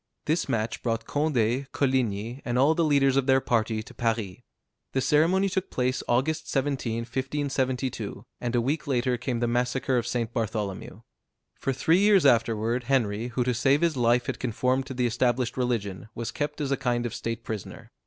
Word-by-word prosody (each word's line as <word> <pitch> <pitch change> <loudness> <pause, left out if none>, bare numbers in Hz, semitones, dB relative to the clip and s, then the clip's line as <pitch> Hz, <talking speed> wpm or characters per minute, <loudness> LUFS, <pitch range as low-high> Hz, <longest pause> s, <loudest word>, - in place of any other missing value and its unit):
This 160 +3 0
match 110 0 -1
brought 115 -1 -1
Condé, 135 -3 0
Coligni, 125 -3 0
and 120 0 -1
all 140 +5 +5
the 170 - +1
leaders 140 -3 +3
of 135 -1 +1
their 135 0 +5
party, 110 -3 0
to - - -13
Paris. 110 -5 -1 0.6
The 135 - +1
ceremony 170 +8 +3
took 190 0 -2
place 130 0 0
August 155 +6 0
17, 130 -5 -1
1572, 130 +1 -2
and 120 0 -2
a 120 - +3
week 145 +6 -1
later 125 -2 +1
came 120 -3 -2
the 120 - +2
massacre 125 +2 0
of 120 - -4
St. 120 -1 -2
Bartholomew. 105 -4 -3 0.5
For 135 - -2
three 160 +7 +3
years 200 -4 +5
afterward 115 -1 +2
Henry, 115 -4 +1
who 125 +1 -1
to 125 +1 0
save 135 +5 +3
his 170 -3 +2
life 120 0 +2
had - - -3
conformed 130 +2 0
to 130 - -6
the 125 0 +1
established 120 +1 +1
religion, 110 -6 -2
was 115 -1 -4
kept 150 +1 -3
as 140 -2 -2
a 135 - +2
kind 120 -1 0
of 120 - -3
state 115 0 -4
prisoner. 105 -4 -7
125 Hz, 185 wpm, -27 LUFS, 115-135 Hz, 0.6 s, all